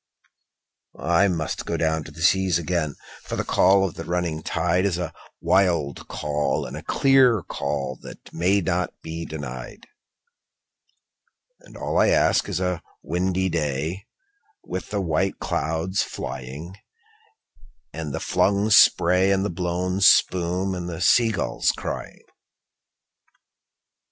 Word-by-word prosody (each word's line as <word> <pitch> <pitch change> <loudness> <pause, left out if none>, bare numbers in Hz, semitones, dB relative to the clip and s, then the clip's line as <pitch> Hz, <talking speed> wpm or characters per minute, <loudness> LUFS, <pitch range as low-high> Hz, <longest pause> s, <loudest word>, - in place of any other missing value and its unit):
I 85 +4 +3
must 85 -5 -3
down - - -1
go 80 -1 0
to - - -10
the 80 +2 -7
seas 95 -2 +3
again, 85 -3 -2 0.3
for - - -5
the - - -1
call 95 +1 +4
of 85 - -8
the 85 - -7
running 85 -2 -2
tide 90 +3 0
Is 95 -4 0
a 90 - -4 0.3
wild 85 -8 +1
call 75 0 -1
and - - -7
a - - -6
clear 130 -7 +4
call 70 -3 -3
that - - -12
may 95 +4 +2
not 90 +1 -2
be 80 +1 -5
denied; 65 -6 -7 1.7
And - - -15
all - - -1
I - - +5
ask - - +3
is 90 -3 -2
a 90 -2 -1 0.2
windy 95 +3 0
day 80 +3 -2 0.6
with 95 - -6
the 105 -1 -1
white 90 +2 0
clouds 80 +6 -1
flying, 70 +7 -6 1.2
And 80 -2 -5
the - - -3
flung 100 +2 +1
spray 90 -1 +5
and 95 0 +2
the 105 - -2
blown 90 +2 -2
spume, 90 0 +3
and 90 -1 -5
the 80 -2 -6
sea 115 +5 +4
gulls 105 - 0
crying. - - -6
90 Hz, 135 wpm, -24 LUFS, 80-95 Hz, 1.7 s, I